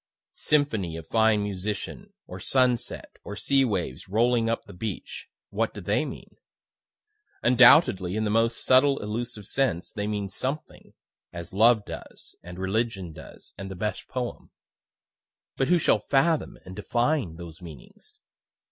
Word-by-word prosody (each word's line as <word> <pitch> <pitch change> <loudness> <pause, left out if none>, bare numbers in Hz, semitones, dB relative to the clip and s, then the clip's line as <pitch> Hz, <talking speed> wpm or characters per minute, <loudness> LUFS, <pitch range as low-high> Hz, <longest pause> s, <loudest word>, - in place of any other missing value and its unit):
Symphony 110 - 0
of 80 - -9
fine 110 -2 +3
musician, 105 - -4
or - - -8
sunset, 125 -3 0
or 105 - -6
sea 135 +5 +2
waves 95 - -2
rolling 115 +2 +2
up 115 - -1
the 100 - -12
beach 110 +5 -6 0.2
what - - -1
do - - -5
they - - +1
mean? - - -9 1.1
Undoubtedly 120 - +6
in 110 - 0
the 105 - 0
most 115 +1 +1
subtle 135 +2 +5
elusive 110 0 -4
sense 130 -8 0
they 105 0 -3
mean 105 -2 -2
something 135 +9 -4 0.4
as 85 0 -7
love 110 +1 +5
does, - - -8
and 90 0 -10
religion 95 -2 -2
does, 80 - -12
and 95 0 -6
the 95 - -6
best 105 +1 -3
poem; 125 -2 -5 1.1
but 135 - +1
who 180 - +5
shall 150 - +3
fathom 145 +8 +1
and 95 - -9
define 120 - 0
those 85 0 -10
meanings? 80 -8 -9
110 Hz, 145 wpm, -26 LUFS, 95-125 Hz, 1.1 s, Undoubtedly